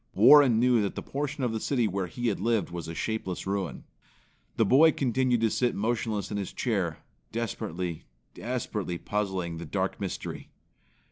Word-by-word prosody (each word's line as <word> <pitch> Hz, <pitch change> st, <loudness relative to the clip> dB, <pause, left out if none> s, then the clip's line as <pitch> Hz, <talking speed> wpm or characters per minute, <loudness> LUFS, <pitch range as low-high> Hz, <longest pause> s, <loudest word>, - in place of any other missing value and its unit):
Warren 130 Hz, +2 st, +7 dB
knew 125 Hz, -1 st, +4 dB
that 100 Hz, -, -2 dB
the -, -, -5 dB
portion 145 Hz, 0 st, -3 dB
of 120 Hz, -3 st, 0 dB
the 110 Hz, -, -1 dB
city 120 Hz, -1 st, +1 dB
where 95 Hz, -1 st, -2 dB
he 120 Hz, +8 st, -2 dB
had 100 Hz, -, -2 dB
lived 115 Hz, -6 st, 0 dB
was 85 Hz, -2 st, -5 dB
a 80 Hz, -, -6 dB
shapeless 110 Hz, -4 st, -3 dB
ruin. 95 Hz, -2 st, -3 dB, 0.7 s
The 115 Hz, -, +4 dB
boy 145 Hz, +9 st, +6 dB
continued 125 Hz, -2 st, +1 dB
to 115 Hz, -1 st, +2 dB
sit 125 Hz, -1 st, +1 dB
motionless 110 Hz, -1 st, -1 dB
in 105 Hz, -, -2 dB
his 100 Hz, -2 st, -3 dB
chair, 95 Hz, -10 st, -1 dB, 0.3 s
desperately, 90 Hz, -7 st, -4 dB, 0.3 s
desperately 105 Hz, -7 st, -3 dB
puzzling 95 Hz, -4 st, -2 dB
the 85 Hz, -, -6 dB
dark -, -, -2 dB
mystery. -, -, -5 dB
110 Hz, 165 wpm, -28 LUFS, 95-120 Hz, 0.7 s, Warren